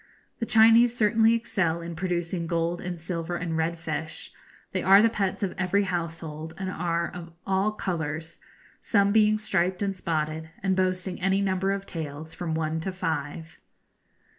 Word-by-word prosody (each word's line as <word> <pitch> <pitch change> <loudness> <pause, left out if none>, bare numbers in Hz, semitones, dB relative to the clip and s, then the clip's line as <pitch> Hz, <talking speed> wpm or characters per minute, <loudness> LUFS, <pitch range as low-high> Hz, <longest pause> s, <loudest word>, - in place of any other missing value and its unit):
The 230 - -2
Chinese 230 +2 +6
certainly 225 0 +4
excel 190 -7 0
in 170 0 -6
producing 175 -1 -2
gold 170 +1 -1
and 175 -1 -5
silver 165 0 -3
and 170 -2 -2
red 165 +1 0
fish; 160 -1 -5 0.4
they - - -1
are 195 +1 +7
the 225 +1 +4
pets 200 -1 -1
of 190 - -1
every 190 +2 +2
household, 165 -3 -4
and 190 -1 -3
are 170 -1 -1
of 170 -1 -8
all 195 +2 +1
colours, 160 -5 -4 0.4
some 200 -2 +3
being 215 0 +4
striped 190 -3 0
and 195 -1 -1
spotted, 160 -2 -2
and 190 -1 +2
boasting 185 0 -1
any 190 +1 +2
number 195 0 +1
of 195 0 -3
tails 160 -2 -6
from 165 -3 -3
one 160 0 -1
to 190 +4 -3
five. 160 -2 -4
180 Hz, 165 wpm, -27 LUFS, 165-195 Hz, 0.4 s, are